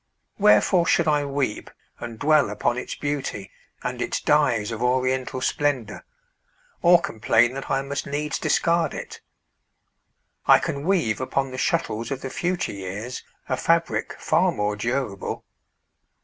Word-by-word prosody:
Wherefore 170 - +4
should 170 - +3
I 150 -1 +2
weep 140 -5 -2 0.3
And 115 -1 -7
dwell 150 -1 +3
upon 105 +3 0
its 125 - -5
beauty, 140 - -4 0.3
and - - -3
its - - -1
dyes 120 -8 +2
Of 115 0 -5
oriental 130 +1 0
splendor, 130 -7 -1 0.8
or 175 0 +7
complain 115 -2 +2
That 135 0 -6
I 135 0 +1
must 140 +1 -4
needs 145 +1 -2
discard 170 0 +1
it? - - -8 1.3
I - - +8
can 140 +1 -3
weave 160 - +1
Upon 135 +1 -1
the 130 - -5
shuttles 115 -8 -1
of 135 -1 -4
the 135 - -5
future 180 0 -1
years 100 +5 -6 0.2
A - - 0
fabric - - 0
far - - +2
more 105 0 -1
durable. 115 -2 -3
130 Hz, 140 wpm, -24 LUFS, 115-145 Hz, 1.3 s, I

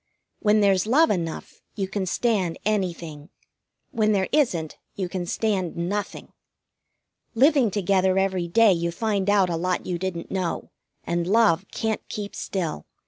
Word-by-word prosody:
When 215 0 +3
there's 195 0 +3
love 310 +8 +4
enough 165 -5 -4
you 195 -3 -2
can 190 -1 -3
stand 195 -5 0
anything. 170 -7 -2 0.6
When 215 -1 +2
there 190 -2 0
isn't, 185 - 0 0.2
you 190 -2 -2
can 175 0 -4
stand 190 -5 -1
nothing. 195 +4 -4 1.0
Living 270 -1 +4
together 190 -1 +1
every 190 -2 0
day 215 +3 +5
you 170 0 -1
find 200 +2 -1
out 195 -3 +3
a - - 0
lot 180 +2 -1
you 175 -1 -3
didn't 180 -2 -4
know, 185 -3 -3 0.3
and 170 0 -1
love 200 -3 +3
can't 220 -1 -2
keep 205 -1 -6
still. 165 - -4
190 Hz, 145 wpm, -24 LUFS, 175-210 Hz, 1.0 s, day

